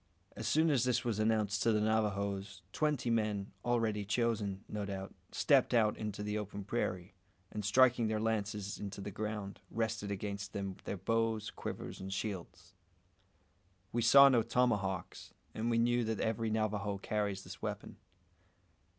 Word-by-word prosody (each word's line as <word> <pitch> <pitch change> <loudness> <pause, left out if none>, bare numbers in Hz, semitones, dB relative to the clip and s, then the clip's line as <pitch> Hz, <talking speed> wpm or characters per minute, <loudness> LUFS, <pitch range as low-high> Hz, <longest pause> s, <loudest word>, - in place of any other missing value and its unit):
As - - -4
soon 160 +1 +4
as 130 -5 +3
this 125 0 +1
was 110 -3 0
announced 110 -2 +1
to 115 - +4
the 105 - +3
Navajoes, 100 -3 -1
twenty 145 -6 +1
men 105 -3 0
already 115 -4 +1
chosen, 105 -2 0
no 105 -1 -4
doubt 95 -1 -5 0.2
stepped - - +3
out 110 -2 +4
into 105 -1 -4
the 105 +1 -1
open 100 -1 -6
prairie, 95 -4 -2 0.4
and 105 - -4
striking 120 +2 +4
their 110 0 0
lances 105 -2 -2
into 100 -1 -6
the 100 +1 -5
ground, 105 -1 -4
rested 110 -2 -2
against 100 0 -4
them 100 -2 -4
their 100 - -3
bows, 115 +1 0
quivers, - - -6
and 95 0 -5
shields. 95 -2 -5 1.2
We 120 - 0
saw 140 +4 +9
no 125 -4 +5
tomahawks, 105 -6 -1 0.2
and 115 +2 -1
we 115 - +2
knew 120 +1 +3
that 110 -1 -2
every 110 0 0
Navajo 105 -2 -1
carries 100 -1 -2
this - - -10
weapon. - - -5
105 Hz, 155 wpm, -34 LUFS, 100-115 Hz, 1.2 s, saw